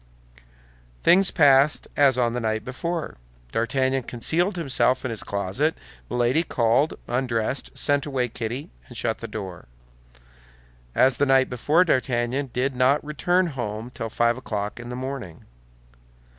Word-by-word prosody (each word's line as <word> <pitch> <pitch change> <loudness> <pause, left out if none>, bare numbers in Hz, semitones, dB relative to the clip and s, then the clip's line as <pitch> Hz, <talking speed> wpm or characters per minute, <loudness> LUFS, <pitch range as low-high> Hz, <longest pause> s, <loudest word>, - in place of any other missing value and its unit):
Things 190 +2 +5
passed 140 +1 +4
as 140 -3 +4
on 120 -2 +1
the 125 - -1
night 110 -1 -2
before. 165 +6 -4 0.3
D'Artagnan 130 +3 0
concealed 165 - 0
himself 135 -6 +1
in 130 - -2
his 110 - -3
closet; 100 - -1 0.3
Milady 125 +5 +2
called, 125 0 +1
undressed, 125 0 -2
sent 145 0 +1
away 130 -3 0
Kitty, 120 +4 -5 0.2
and - - -10
shut - - -1
the - - -6
door. 95 -5 -7 1.3
As 130 -2 +4
the 145 - +2
night 135 -1 +4
before, 150 +9 +3
D'Artagnan 130 -2 0
did 130 +3 -1
not 130 +4 +2
return 175 +6 +1
home 120 -6 -5
till 115 -2 -5
five 120 +2 +1
o'clock 105 -4 -4
in 120 0 -8
the 125 - -5
morning. 125 -10 -6
130 Hz, 140 wpm, -24 LUFS, 120-145 Hz, 1.3 s, Things